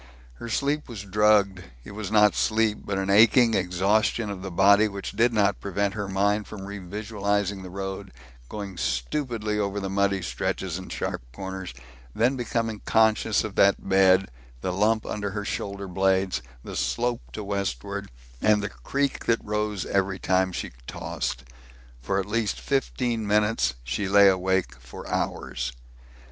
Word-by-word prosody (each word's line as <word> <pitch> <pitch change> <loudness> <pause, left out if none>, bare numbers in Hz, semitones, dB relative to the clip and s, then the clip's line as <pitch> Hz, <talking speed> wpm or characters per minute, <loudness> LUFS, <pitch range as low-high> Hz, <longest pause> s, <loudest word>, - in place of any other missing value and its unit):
Her 115 - -6
sleep 145 +5 -1
was 110 -5 -6
drugged 100 -1 +3 0.2
it - - -10
was 105 -1 -5
not 105 -1 +5
sleep, 110 -1 +1
but 95 - -2
an 95 0 0
aching 115 +3 +6
exhaustion 100 +4 +1
of 95 -2 -6
the 95 - -5
body 100 +4 +5
which 100 -1 -6
did 115 +4 +3
not 100 -3 +2
prevent 100 0 -1
her 105 -1 -3
mind 100 +2 +1
from 105 - -8
revisualizing 100 0 -2
the 95 - -8
road, 95 +1 -5 0.4
going 100 -3 -6
stupidly 105 - -1
over 100 0 -1
the 95 -1 -4
muddy 100 -1 +1
stretches 90 0 -2
and 95 - -9
sharp - - -3
corners, 95 +5 -6 0.4
then 125 +4 +2
becoming 115 -3 -2
conscious 110 -1 +3
of 110 - -5
that 100 0 +4
bed, 95 0 +4 0.3
the 90 - -2
lump 110 +3 +2
under 105 -1 -3
her 105 +1 -4
shoulder 100 -1 -4
blades, 95 -1 +1 0.2
the - - -7
slope 120 0 0
to 110 - -5
westward, 100 -11 -3 0.3
and 105 -1 +3
the 105 - -2
creak 140 +5 -2
that 115 -1 +1
rose 105 -2 -2
every 95 -1 0
time 95 0 +1
she - - -4 0.2
tossed. - - -4 0.6
For 95 +10 0
at 95 - -2
least 105 +1 -1
fifteen 125 -5 -1
minutes 105 - +2
she 95 +11 -2
lay 100 0 +7
awake 95 0 +1
for - - -10
hours. 65 0 -2
100 Hz, 155 wpm, -26 LUFS, 95-110 Hz, 0.6 s, lay